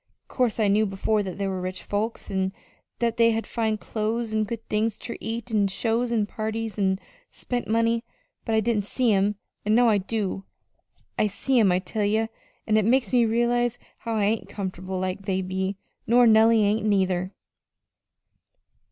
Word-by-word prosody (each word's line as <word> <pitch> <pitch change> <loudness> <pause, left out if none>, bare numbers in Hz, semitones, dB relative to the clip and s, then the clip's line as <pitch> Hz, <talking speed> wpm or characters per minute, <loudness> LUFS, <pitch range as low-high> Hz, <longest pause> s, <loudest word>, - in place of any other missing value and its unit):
'Course 245 -4 0
I 215 - +3
knew 210 +2 +3
before 195 +2 0
that 190 -2 -5
there 195 -1 -1
was 185 -1 -3
rich 185 +1 -5
folks, 215 +3 -3
an' 190 0 0 0.4
that 235 0 0
they 230 0 +5
had 225 0 -2
fine 220 -2 -1
clo's 220 +1 -2
an' 215 0 +1
good 225 +1 -6
things 215 0 0
ter 235 - -6
eat, 230 +2 -5
an' 205 -2 +3
shows 230 +4 -1
an' 220 -3 +2
parties, 220 +1 -4
an' 190 -1 +2 0.3
spent 245 -1 -4
money; 230 +1 +1 0.4
but 225 - 0
I 220 - +4
didn't 215 -2 0
see 240 +1 +1
'em, 200 +1 +2 0.3
an' 215 +1 +2
now 240 0 +5
I 210 -2 +3
do. 195 -1 -3 0.8
I 215 - +4
see 245 +6 +1
'em, 205 -5 +5
I 180 - +3
tell 195 +3 -3
ye, 215 +2 +2 0.4
an' 215 0 +2
it 215 - +3
makes 245 -2 +2
me 240 -2 +5
realize 240 +1 +1 0.2
how 230 -1 -3
I 210 - +1
ain't 215 +2 0
comfortable 185 -1 -5
like 185 +1 -2
they 190 -1 0
be, 190 +1 -2 0.3
nor 240 +2 +6
Nellie 220 0 +6
ain't 210 +2 +1
neither!" 190 -2 +1
215 Hz, 185 wpm, -25 LUFS, 195-230 Hz, 0.8 s, nor